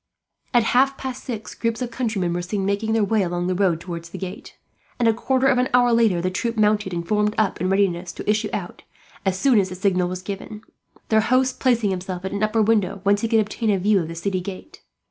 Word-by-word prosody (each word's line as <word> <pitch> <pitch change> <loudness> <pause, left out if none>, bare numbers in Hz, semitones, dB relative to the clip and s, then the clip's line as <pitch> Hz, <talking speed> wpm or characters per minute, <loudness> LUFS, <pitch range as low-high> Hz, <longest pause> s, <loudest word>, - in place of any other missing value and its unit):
At 240 -3 +4
half 270 +2 +3
past 260 -1 -6
six 225 -5 -5
groups 230 -1 -2
of 250 -2 -4
countrymen 215 -8 -1
were 175 - -2
seen, 190 +2 -3
making 205 +3 0
their 225 -1 +2
way 210 +1 +2
along 175 -1 -1
the 185 - 0
road 180 -3 +1
towards 170 -1 -7
the - - -8
gate 190 +2 -8 0.4
and, 240 - +2
a 225 - +5
quarter 260 +3 0
of 265 -2 +4
an 250 - +1
hour 245 -1 +4
later, 225 -6 +3
the 185 - 0
troop 230 +5 -2
mounted 210 -2 +2
and 170 -1 -4
formed 210 0 +1
up, 210 -6 0
in 185 - 0
readiness 185 -3 +1
to - - -8
issue 210 +1 +1
out 180 -3 -5 0.5
as 185 -1 +1
soon 260 -6 +4
as 190 -1 0
the 185 - -6
signal 185 -1 +1
was 185 0 -5
given; 205 +2 -7 0.5
their 220 -1 +4
host 255 +3 +1
placing 235 -6 +2
himself 185 0 -4
at 190 - -3
an 200 - -3
upper 215 +1 +2
window, 200 -3 +1
whence 205 0 +3
he 230 - 0
could 225 -1 +3
obtain 215 +2 -2
a 200 - +3
view 200 +2 +3
of 165 - -3
the 165 - -7
city 185 +2 -2
gate. 190 - -9
205 Hz, 240 wpm, -22 LUFS, 185-225 Hz, 0.5 s, a